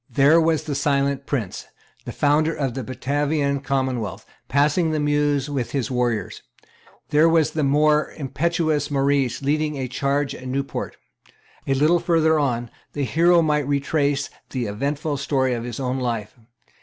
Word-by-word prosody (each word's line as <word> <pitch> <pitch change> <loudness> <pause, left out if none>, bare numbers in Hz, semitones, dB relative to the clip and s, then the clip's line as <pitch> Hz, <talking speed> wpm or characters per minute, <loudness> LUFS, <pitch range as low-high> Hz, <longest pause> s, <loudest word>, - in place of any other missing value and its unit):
There 150 +4 +5
was 160 -1 +1
the 150 - -4
silent 140 -1 0
prince, 115 -10 -3 0.4
the - - -5
founder 155 +2 +2
of 135 -4 -2
the 130 - -4
Batavian 140 +3 -1
commonwealth, 130 -8 -2 0.2
passing 150 +5 +2
the 155 -1 -1
Meuse 145 -1 +1
with 135 -5 -3
his 135 -3 -1
warriors. 120 -5 -1 0.7
There 155 +2 +4
was 160 -2 +3
the 160 - -2
more 150 +2 +3
impetuous 155 +1 -1
Maurice 140 -2 +1
leading 150 +2 0
the 135 -3 -3
charge 140 +2 -1
at 130 - -9
Nieuport. 135 +2 -4 0.7
A 135 - +2
little 155 +6 +3
further 160 -2 +2
on, 120 -5 -1 0.2
the 145 - -2
hero 170 +7 +4
might 150 -3 +1
retrace 145 0 0 0.2
the 125 -3 -3
eventful 140 +8 -2
story 130 -2 0
of 120 -1 -4
his 120 0 -6
own 130 0 -2
life. 115 -4 -3
140 Hz, 155 wpm, -22 LUFS, 130-150 Hz, 0.7 s, There